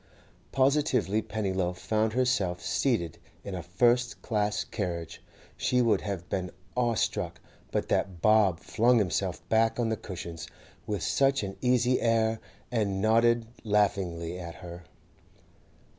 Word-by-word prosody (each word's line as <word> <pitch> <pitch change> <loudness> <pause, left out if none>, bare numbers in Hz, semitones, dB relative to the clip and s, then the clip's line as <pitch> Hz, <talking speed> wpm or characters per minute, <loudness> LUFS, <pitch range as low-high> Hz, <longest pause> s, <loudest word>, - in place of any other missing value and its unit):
Positively, 130 -6 +2
Pennyloaf 95 -5 -2
found 110 +3 0
herself 115 -8 +1
seated 110 - 0 0.2
in 100 - -6
a 90 - -3
first 120 +8 +1
class 105 -3 0
carriage; 85 -5 -4 0.3
she 125 - +1
would 115 -5 +3
have 95 -4 -4
been 90 -1 -2 0.3
awe 120 -2 +1
struck, - - -1 0.3
but - - -1
that 95 -3 0
Bob 100 -2 +4
flung 120 +6 +3
himself 100 -6 -1
back 115 +1 +2
on 115 -2 +1
the 110 - +1
cushions 85 -5 -7 0.4
with 105 -2 -2
such 135 -3 +2
an 95 -1 -5
easy 125 0 +2
air, 115 -1 +2 0.3
and 105 -5 0
nodded 115 +2 +3 0.2
laughingly 90 -5 0
at 85 -2 -7
her. 85 -1 -10
105 Hz, 130 wpm, -28 LUFS, 90-120 Hz, 0.4 s, Bob